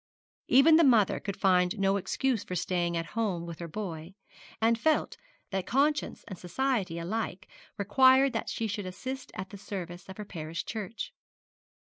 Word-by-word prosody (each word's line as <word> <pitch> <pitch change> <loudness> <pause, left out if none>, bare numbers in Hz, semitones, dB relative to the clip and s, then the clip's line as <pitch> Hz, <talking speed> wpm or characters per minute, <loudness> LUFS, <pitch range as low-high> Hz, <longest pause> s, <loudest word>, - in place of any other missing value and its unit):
Even 295 +5 +7
the 335 - +6
mother 230 -8 +4
could 200 -2 -5
find 180 0 +3
no 195 0 +2
excuse 220 +5 0
for 180 - -5
staying 175 -1 0
at 165 - -2
home 200 -7 -1
with 170 -1 -8
her 170 - -5
boy, 170 -1 -6 0.4
and 230 +1 +3
felt 315 +5 +1 0.4
that 190 -2 -2
conscience 290 +3 +1
and 190 -5 -8
society 195 -3 -1
alike 185 +2 -3 0.3
required 260 +6 +5
that 225 - -2
she 225 - -2
should 205 -2 -3
assist 255 +8 -6
at 190 +1 -6
the 200 - -9
service 180 -3 -7
of 190 - -9
her 210 - -6
parish 165 -3 -5
church. 220 0 -5
200 Hz, 165 wpm, -29 LUFS, 180-230 Hz, 0.4 s, Even